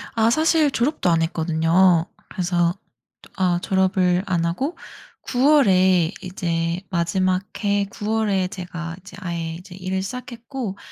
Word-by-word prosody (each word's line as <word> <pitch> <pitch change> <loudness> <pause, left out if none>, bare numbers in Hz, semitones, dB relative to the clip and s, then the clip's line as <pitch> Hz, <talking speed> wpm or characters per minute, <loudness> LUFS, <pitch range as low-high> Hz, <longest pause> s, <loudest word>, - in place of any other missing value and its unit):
아 225 0 +3
사실 315 +2 +3
졸업도 260 - 0
안 165 -1 +3
했거든요. 165 +2 +3 0.2
그래서 175 -2 0 0.5
또 - - -17
아 180 -3 +1
졸업을 185 -1 +2
안 175 -3 +1
하고 270 - -2 0.4
9 265 +4 +2
월에 185 - +4
이제 170 -2 -2
마지막 185 +1 +1 0.2
해 200 0 +2
9 210 +1 -6
월에 205 -4 +1
제가 175 -3 -6
이제 190 0 -13
아예 170 -3 -4
이제 180 +1 -11
일을 190 0 -3
시작했고 235 -1 -6
185 Hz, 255 characters per minute, -22 LUFS, 170-210 Hz, 0.5 s, 월에